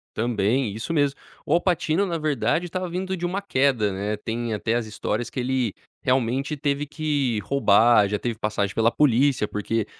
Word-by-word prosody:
Também, 115 +1 0
isso 110 +10 -4
mesmo, 145 -3 +1 0.3
o 150 - +1
Al 175 - +4
Pacino, 175 +1 +1
na 170 -3 -2
verdade, 155 +2 0
estava 185 +1 -4
vindo 185 +2 -3
de 175 -1 -4
uma 185 +3 -2
queda, 130 - +1
né, 105 +2 -2
tem 115 +1 -3
até 110 +2 -1
as 120 -2 -1
histórias 110 +2 -3
que 130 - -5
ele 125 -4 0 0.3
realmente 130 +3 0
teve 145 +1 -1
que 145 -7 -1
roubar, 115 -4 +4
já 105 - 0
teve 115 +1 -3
passagem 105 -2 -1
pela 115 0 +3
polícia, 135 -4 +3
porque 105 +1 -2
130 Hz, 180 wpm, -24 LUFS, 110-150 Hz, 0.3 s, Al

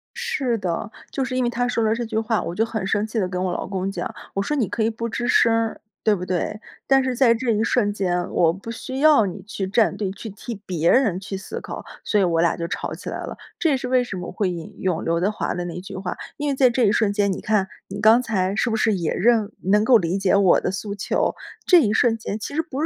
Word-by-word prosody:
是 300 - -1
的， 185 +1 -3 0.2
就 270 - -1
是 255 -1 -3
因 255 - +1
为 240 - +1
他 245 +1 -1
说 235 -2 0
了 220 0 +3
这 240 +1 -3
句 220 -1 -3
话， 225 0 +1
我 170 - -5
就 225 - +2
很 220 -4 -3
生 205 +2 +1
气 220 +1 -3
地 190 - +1
跟 180 0 -3
我 180 -1 -1
老 - - -4
公 190 0 -2
讲， - - -4 0.2
我 195 - +1
说 295 +9 -1
你 245 -8 +1
可 220 - -1
以 220 - +2
不 230 +1 -4
吱 240 +2 -3
声 235 -2 +4
儿， 225 -1 -1 0.2
对 215 -2 +4
不 180 -1 -5
对？ 185 +3 -2 0.3
但 270 0 +4
是 260 -1 -1
在 240 -2 +5
这 235 +1 -1
一 215 0 +1
瞬 230 -3 +2
间， 180 -3 -1
我 165 -1 +3
不 195 +5 -8
需 260 +3 -5
要 300 -7 +6
你 190 +1 -5
去 200 -1 -4
站 220 +3 +2
队， 195 -3 -2
去 220 +3 -8
替 220 +4 -7
别 170 -2 +1
人 220 -9 +3
去 195 0 -5
思 190 - -6
考。 - - -7 0.2
所 210 - +1
以 195 - +4
我 165 -2 +2
俩 170 - +2
就 170 - -4
吵 - - -4
起 - - -7
来 - - -4
了， - - -7 0.2
这 330 - +2
也 275 - +2
是 255 0 -5
为 255 -1 +3
什 225 -6 -6
么 180 - -6
会 190 0 -1
引 170 -2 -7
用 180 -3 0
刘 165 0 +1
德 185 +4 +2
华 210 - -2
的 175 0 -3
那 175 0 -5
句 185 - -9
话， 185 -1 -4 0.2
因 295 -1 -1
为 275 - 0
在 260 -1 +5
这 240 -1 +2
一 200 - +4
瞬 210 -1 +2
间， 205 -1 +1
你 185 - -4
看 210 -3 +1 0.2
你 200 +1 -6
刚 225 +3 +6
才 195 -5 -1
是 240 - +1
不 220 - 0
是 220 0 +2
也 170 -4 -1
认 220 0 +2
能 205 +3 +3
够 240 +2 +6
理 180 -1 -1
解 195 0 +2
我 195 -3 +5
的 - - -1
诉 200 +2 -4
求， 200 - 0 0.3
这 355 -3 +7
一 210 -5 +1
瞬 230 +1 +3
间 215 -1 -5
其 250 - -6
实 320 - +2
不 290 -3 -5
215 Hz, 300 characters per minute, -23 LUFS, 190-240 Hz, 0.3 s, 这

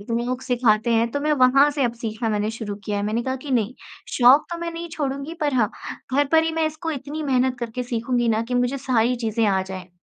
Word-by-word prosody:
इतने 230 +3 -2
लोग 250 +1 -2
सिखाते 235 -3 +2
हैं 230 +1 +2
तो 285 - -2
मैं 300 +1 +1
वहाँ 275 +3 +5
से 285 -2 0
अब 235 - 0
सीखना 225 0 -3
मैंने 210 0 0
शुरू 220 -2 -5
किया 205 -2 -2
है। 200 - -1
मैंने 215 +3 -1
कहा 260 +1 -2
कि 275 +2 -9
नहीं 240 -2 0 0.4
शौक़ 255 +4 +7
तो 340 - -4
मैं 340 0 -3
नहीं 335 +1 -6
छोड़ूँगी 280 0 -4
पर 295 -3 0
हाँ, 220 -5 +2 0.4
घर 285 +1 +3
पर 320 0 +6
ही 325 - -1
मैं 320 0 +1
इसको 310 +2 -4
इतनी 295 +1 -5
मेहनत 260 -3 +1
करके 235 +1 -4
सीखूँगी 240 0 -1
ना 220 0 +2
कि 250 - -2
मुझे 245 +2 +1
सारी 250 -2 +1
चीज़ें 225 -1 -1
आ 195 -2 +2
जाएँ। 190 -1 -8
250 Hz, 245 wpm, -23 LUFS, 225-280 Hz, 0.4 s, शौक़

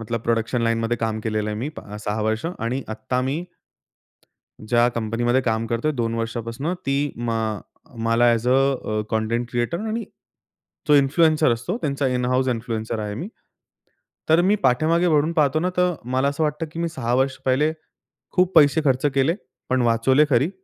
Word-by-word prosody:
मतलब 115 0 -3
प्रोडक्शन 115 +1 0
लाईनमध्ये 115 0 0
काम 110 -1 -1
केलेलं 110 -1 -1
आहे 105 - -4
मी 125 +6 -3
प - - -6 0.2
6 105 +1 -2
वर्ष 110 +4 -1 0.2
आणि 130 +3 -2
आत्ता 125 +2 -2
मी 160 +6 -2 1.2
ज्या 120 +1 +4
कंपनीमध्ये 120 +3 0
काम 115 -1 0
करतोय 120 +7 -1
2 115 -3 -2
वर्षापासून, 115 +7 -3
ती 145 -4 -1
म 120 0 -3
अ, 110 +6 -5
मला 115 +1 +2
अ‍ॅज 115 0 0
अ 130 -5 +1
कंटेंट 115 +2 -1
क्रिएटर 120 +8 -1
आणि 225 +1 -2 0.8
जो 150 - +6
इन्फ्लुएन्सर 150 0 +4
असतो, 130 - -3
त्यांचा 140 - -1
इन 125 -1 -1
हाउस 130 +1 +1
इन्फ्लुएन्सर 115 -2 -3
आहे 105 -1 -4
मी. 150 - -5 1.0
तर 160 +2 +5
मी 200 +3 +3
पाठीमागे 165 +7 +3
वळून 155 0 +2
पाहतो 155 -2 +2
ना, 180 +2 0
तर 180 0 +2
मला 130 +3 0
असं 140 +3 -2
वाटतं 150 +2 -2
की 165 - -7
मी 170 - 0
6 120 -7 -2
वर्ष 135 +1 +1
पहिले 145 +4 +2 0.6
खूप 180 0 +2
पैसे 150 0 +6
खर्च 130 0 +2
केले, 140 +5 +2 0.3
पण 130 0 +2
वाचवले 125 +6 +3
खरी. 135 +4 +3
125 Hz, 170 wpm, -22 LUFS, 115-150 Hz, 1.2 s, जो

